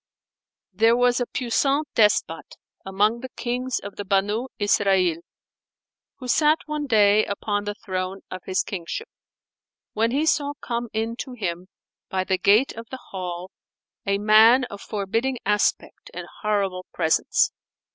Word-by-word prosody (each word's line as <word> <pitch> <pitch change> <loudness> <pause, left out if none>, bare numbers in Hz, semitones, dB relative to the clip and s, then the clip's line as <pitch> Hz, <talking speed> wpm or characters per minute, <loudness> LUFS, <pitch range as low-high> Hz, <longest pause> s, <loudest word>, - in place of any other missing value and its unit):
There 225 +5 +4
was 245 0 +3
a 245 - -1
puissant 275 +4 0
despot 210 -6 +1 0.3
among 205 +4 +1
the 260 +1 -7
Kings 250 +1 -3
of 200 - -8
the 205 - -4
Banϊ 205 +5 0
Isrανl, 195 -5 +2 1.0
who 255 - -8
sat 305 +5 +4
one 300 -1 -3
day 210 -3 +5
upon 205 0 -2
the 205 0 -3
throne 185 -1 -4
of 185 - -6
his 185 0 0
kingship, 190 - -5 0.9
when 225 +2 +1
he 285 +6 0
saw 290 -2 +1
come 235 -3 -4
in 225 +2 -2
to 255 +1 -6
him, 180 -6 -4 0.4
by 190 -1 -1
the 185 0 -1
gate 210 +8 +4
of 230 +1 -9
the 260 - -8
hall, 180 -1 -5 0.5
a 200 0 0
man 220 +5 +6
of 200 - -8
forbidding 225 +5 -2
aspect 210 +1 0
and - - -5 0.2
horrible 195 -4 -1
presence. 160 -2 +2
210 Hz, 145 wpm, -24 LUFS, 195-245 Hz, 1.0 s, man